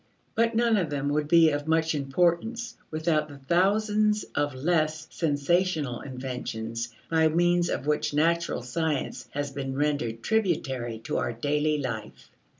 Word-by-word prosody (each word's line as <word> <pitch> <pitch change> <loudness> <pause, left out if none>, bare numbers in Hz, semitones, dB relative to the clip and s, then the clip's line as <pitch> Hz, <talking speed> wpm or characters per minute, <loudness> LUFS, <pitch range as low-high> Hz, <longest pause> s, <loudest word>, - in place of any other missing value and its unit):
But 230 0 +2
none 230 -1 +3
of 175 -6 0
them 145 -1 -1
would 150 0 0
be 165 0 +6
of 145 +1 -3
much 160 0 +2
importance 175 - 0
without 155 -1 0
the 145 - -10
thousands 210 +7 +2
of 145 -2 0
less 155 +2 0
sensational 155 -2 0
inventions 125 -3 -5 0.2
by 160 -1 +4
means 175 +2 +2
of - - -2
which 150 0 +1
natural 165 -1 +1
science 150 +3 -2
has 145 -1 -3
been 135 -1 -4
rendered 135 -6 -1
tributary 135 - 0
to - - -2
our - - -1
daily 150 +5 0
life. 115 -6 -6
150 Hz, 145 wpm, -27 LUFS, 135-175 Hz, 0.2 s, be